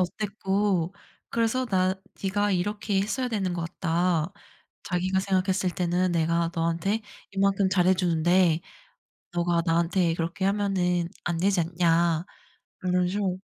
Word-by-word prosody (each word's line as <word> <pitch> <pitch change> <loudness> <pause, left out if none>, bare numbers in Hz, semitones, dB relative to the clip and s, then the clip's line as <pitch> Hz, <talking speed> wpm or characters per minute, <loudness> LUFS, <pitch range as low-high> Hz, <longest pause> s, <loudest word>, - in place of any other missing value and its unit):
어땠고 195 -1 0 0.4
그래서 235 +3 +1
나 185 -3 +2 0.3
네가 205 +1 +1
이렇게 205 +2 0
했어야 250 +6 -1
되는 195 -5 -1
것 170 - -3
같다. 170 0 0 0.5
자기가 185 +1 0
생각했을 190 -1 +1
때는 180 0 +1
내가 170 0 +1
너한테 170 +6 0 0.3
이만큼 195 0 +2
잘해주는데 175 -2 +3 0.7
너가 175 -1 +1
나한테 170 +1 +2
그렇게 170 +3 -3
하면은 185 -4 +1 0.2
안 175 -1 -1
되지 190 +1 +2
않냐." 170 0 +2 0.6
이런 180 0 +2
식으로 190 -1 -2
185 Hz, 280 characters per minute, -26 LUFS, 170-195 Hz, 0.7 s, 잘해주는데